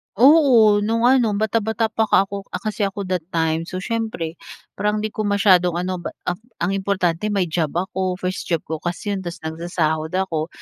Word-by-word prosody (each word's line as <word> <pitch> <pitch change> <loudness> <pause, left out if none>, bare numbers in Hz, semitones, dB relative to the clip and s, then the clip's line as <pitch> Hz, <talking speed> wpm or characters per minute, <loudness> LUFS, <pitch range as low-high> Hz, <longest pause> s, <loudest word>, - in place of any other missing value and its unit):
Oo, 240 -5 +6
no'ng 225 +3 0
ano 245 -4 +4
bata-bata 220 +1 0
pa 220 0 +1
ka 195 - +5
ako, 200 0 -7
ah, - - -4
kasi 215 -2 -1
ako 200 +1 -5
that 185 -3 -3
time. 160 0 0
So, 185 +1 -5
siyempre 220 -8 -3 0.4
parang 210 +1 -1
'di - - +1
ko 215 - -3
masyadong 185 -4 +4
ano 185 +1 -2
b 175 - -5 0.2
ang 180 - +1 0.2
ang 175 +3 0
importante 195 -1 0
may 200 -3 +1
job 160 -3 -1
ako, 185 +1 -1
first 185 0 -4
job 165 -2 +1
ko 160 0 -5
kasi 175 +5 -3
'yon 200 - -1
tapos 175 -3 -7
nagsasahod 160 -1 -2
ako. 165 -5 -1
190 Hz, 190 wpm, -21 LUFS, 175-215 Hz, 0.4 s, Oo